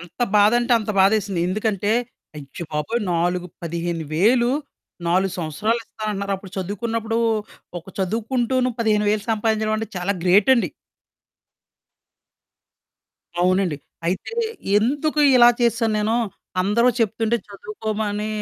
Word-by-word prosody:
ఎంత 175 +7 -14 0.2
బాధంటే 240 +4 +4
అంత 215 -1 -4
బాధేసింది. 195 -2 +2
ఎందుకంటే, 205 0 -1 0.5
అయ్య 145 +3 -8
బాబోయ్! 150 +11 -1
నాలుగు 175 +1 0 0.2
15,000, 170 - +1 0.6
4 185 +2 +2
సంవత్సరాలిస్తానంటన్నార? 205 +4 -2
అప్పుడు 190 0 -13
చదువుకున్నప్పుడూ, 225 +4 -2 0.6
ఒక 170 - -17
చదువుకుంటూను 240 +6 0
15,000 210 -1 +1
సంపాదించడవంటే 220 0 0
చాలా 180 +3 0
గ్రేటండి. 200 - +4 2.7
అవునండి. 180 -3 +2 0.3
అయితే, 185 - -2 0.4
ఎందుకు 290 +7 0 0.2
ఇలా 240 -1 +8
చేసేశాను 230 -1 +2
నేను? 220 +2 +1 0.5
అందరూ 210 +6 +2
చెప్తుంటే 225 +1 +1
చదువుకోమనీ 215 - -4
210 Hz, 90 wpm, -22 LUFS, 185-230 Hz, 2.7 s, ఇలా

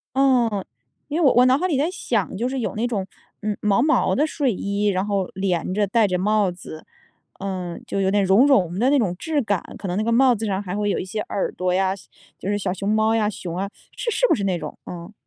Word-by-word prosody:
嗯， 245 -7 +2 0.4
因 300 +3 -2
为 - - +4
我 270 - +6
我 250 +1 +6
脑 255 +1 +5
海 365 +5 0
里 305 - 0
在 295 +5 +1
想， 225 - -2
就 240 +5 -1
是 265 - -3
有 235 - -3
那 230 +3 0
种， 200 -5 -2 0.4
嗯， 210 -1 -1
毛 210 +2 +3
毛 305 +2 +2
的 295 - +3
睡 290 -4 0
衣， 200 +2 -1
然 190 0 +1
后 200 -3 0
连 185 -2 -1
着、 205 0 +2
带 215 +2 +3
着 185 -1 0
帽 205 0 +2
子， 175 -3 -10 0.5
嗯， 185 -3 -4
就 195 - -2
有 190 - +2
点 200 0 +2
绒 200 +9 +5
绒 190 - +2
的 250 - +3
那 290 - +4
种 195 -9 0
质 310 +2 -1
感， 200 -6 0 0.2
可 195 - -6
能 180 - -2
那 215 - +1
个 230 - 0
帽 255 +2 +5
子 225 -1 -3
上 195 -1 -1
还 185 -1 -4
会 205 0 0
有 - - 0
一 - - -3
些 205 +3 -5
耳 195 - -2
朵 180 0 -1
呀 190 0 +1
西 195 - -17 0.3
就 195 - -4
是 205 - +1
小 190 -2 -2
熊 200 +1 -3
猫 215 +1 +3
呀， 210 -2 +2
熊 175 -4 -6
啊， 195 +1 -2 0.3
是 - - -2
是 - - +2
不 - - +4
是 200 - -3
那 185 -2 0
种？ 155 -3 -7
嗯。 175 +3 -8
205 Hz, 280 characters per minute, -22 LUFS, 190-240 Hz, 0.5 s, 我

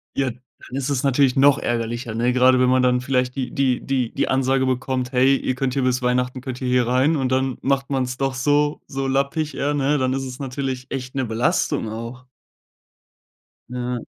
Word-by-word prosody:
Ja, 135 -2 0
dann 125 +1 -14
ist 135 0 -2
es 140 -3 0
natürlich 135 -1 +3
noch 140 +1 +5
ärgerlicher, 115 -1 -3
ne, 120 +2 +1
grade 130 0 +5
wenn 125 - +4
man 130 0 +3
dann 125 0 +3
vielleicht 125 -1 -1
die 130 -2 -3
die 130 -3 +1
die 130 -4 -1
die - - 0
Ansage 130 0 +1
bekommt 130 0 -1
„hey, 135 +1 +4
ihr 130 - -2
könnt 130 0 -1
hier 135 - 0
bis 125 0 +1
Weihnachten 125 +1 0
könnt 130 -1 -6
ihr 130 - -2
hier 125 -1 +2
rein,“ 130 +6 +2
und 130 -3 -1
dann 130 -1 0
macht 135 0 0
man's 130 -2 -1
doch 135 -1 -1
so 145 +3 +1
so 135 -1 -3
lappig, 140 +2 -1
eher, 145 +1 -1
ne, 145 +1 +1
dann 130 -1 0
ist 135 0 -2
es 130 -1 -7
natürlich 130 -1 -4
echt 130 -1 -5
'ne 135 -1 0
Belastung 115 -1 0
auch. 115 +3 -7 1.4
Ja. 125 0 -3
130 Hz, 205 wpm, -22 LUFS, 125-135 Hz, 1.4 s, noch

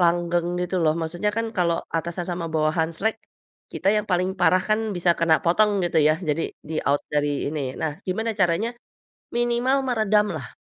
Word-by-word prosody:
langgeng 175 0 +2
gitu 180 +1 -2
loh, 155 -1 +4
maksudnya 175 +6 -1
kan 230 0 0
kalau 170 -2 +1 0.2
atasan 170 +2 -3
sama 175 -1 -3
bawahan 160 +1 +1
slek, 220 +4 0 0.6
kita - - -1
yang 210 - 0
paling 185 +2 +1
parah 180 +1 +4
kan 215 +1 +3 0.2
bisa 175 0 +2
kena 165 -1 +4
potong 210 +5 +4
gitu 170 - -1
ya, 155 - +4
jadi 150 +2 +1 0.3
di-out 145 -2 0
dari 145 -1 0
ini. 150 0 -3 0.2
Nah 155 - -1 0.2
gimana 220 +5 -1
caranya, 180 +5 +2 0.7
minimal 240 +3 +2
meredam 215 -3 +2
lah? - - -8
175 Hz, 170 wpm, -24 LUFS, 165-210 Hz, 0.7 s, loh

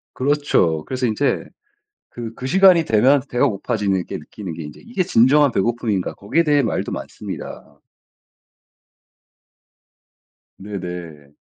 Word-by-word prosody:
그렇죠. 130 - +1
그래서 130 -1 -2
인제 110 +6 0 0.7
그 115 -2 -7
그 130 - -5
시간이 185 -1 +5
되면 130 +5 +4
배가 125 +3 +2
고파지는 100 -4 -1
게 - - -5
느끼는 95 -6 -8
게 80 - -7
인제 75 - -10
이게 225 -6 -1
진정한 145 -2 +4
배고픔인가 110 -3 -1
거기에 155 +12 0
대해 145 -2 +3
말도 115 - -2
많습니다. 70 0 -8 2.8
네네. 90 -7 -8
115 Hz, 265 characters per minute, -20 LUFS, 95-145 Hz, 2.8 s, 시간이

